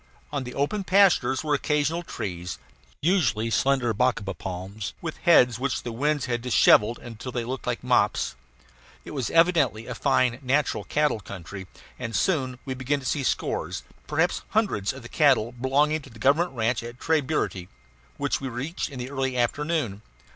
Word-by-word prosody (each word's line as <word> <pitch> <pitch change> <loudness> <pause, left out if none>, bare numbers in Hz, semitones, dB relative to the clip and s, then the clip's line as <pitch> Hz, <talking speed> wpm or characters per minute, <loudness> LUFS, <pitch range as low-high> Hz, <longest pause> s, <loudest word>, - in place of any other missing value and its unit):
On 140 -3 -2
the 125 - -7
open 170 +9 0
pastures 180 -10 +4
were 150 -1 0
occasional 150 +3 +1
trees, 90 - -5 0.5
usually 115 - +2
slender 130 -2 +2
bacaba 105 -4 0
palms, 95 +4 -6
with 160 -2 -5
heads 125 - +5
which 135 -1 -1
the 120 - -4
winds 145 +4 0
had 120 -2 -2
dishevelled 115 -2 +5
until 120 +2 -8
they 120 -1 -2
looked 130 +2 -5
like 120 0 -2
mops. 115 - +2 0.7
It - - -8
was 135 -5 -2
evidently 165 -10 +3
a - - -5
fine 130 -3 +2
natural 140 +3 0
cattle 150 -6 +1
country, 95 -1 -8 0.3
and 115 -2 -4
we - - +1
soon 130 - 0
began 130 +1 -1
to 135 - -11
see 145 - 0
scores, 135 - -2 0.2
perhaps - - +1
hundreds, 195 - +1
of 135 -1 -10
the - - -8
cattle 130 -6 +3
belonging 140 +5 +1
to - - -13
the 115 - -14
government 145 +9 +2
ranch 115 0 0
at 120 +1 -9
Tres 160 -1 +2
Burity, 130 - -2 0.5
which - - -1
we 135 - -3
reached 135 +8 -4
in 140 - -9
the 125 +2 -5
early 135 -2 -1
afternoon. 125 -3 -1
130 Hz, 170 wpm, -26 LUFS, 115-150 Hz, 0.7 s, heads